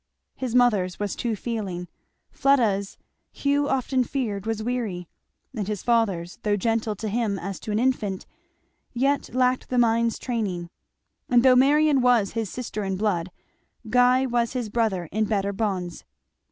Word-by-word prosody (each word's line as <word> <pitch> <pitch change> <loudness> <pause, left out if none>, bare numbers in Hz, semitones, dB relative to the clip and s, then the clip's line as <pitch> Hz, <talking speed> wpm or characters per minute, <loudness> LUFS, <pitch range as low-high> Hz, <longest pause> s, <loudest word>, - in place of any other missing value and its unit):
His 250 -2 -3
mother's 210 -8 +3
was 205 -1 -2
too 235 -2 -2
feeling; 200 -6 -4 0.4
Fleda's 225 -8 +1 0.3
Hugh 285 0 0
often 260 -1 +1
feared 225 -6 -3
was 220 -1 -2
weary; 220 -8 -3 0.5
and 205 -4 -3
his 210 -3 -3
father's, 200 -8 0
though 210 -1 +1
gentle 220 +1 0
to 215 +2 -5
him 215 -2 -1
as 195 +1 -5
to 215 - -6
an 210 - +1
infant, 220 -6 0 0.7
yet 275 +3 0
lacked 255 0 +1
the 250 - -1
mind's 230 -1 +2
training. 195 -8 -3 0.6
And 245 -1 +5
though 260 -1 +6
Marion 285 +2 +4
was 240 -5 +3
his 225 -3 -3
sister 220 -3 -5
in 195 -1 -2
blood, 185 -4 0 0.6
Guy 250 +2 +4
was 240 -2 0
his 245 -4 -3
brother 205 -6 0
in 215 +2 +1
better 200 -1 -1
bonds. 190 -5 -3
225 Hz, 155 wpm, -25 LUFS, 200-250 Hz, 0.7 s, though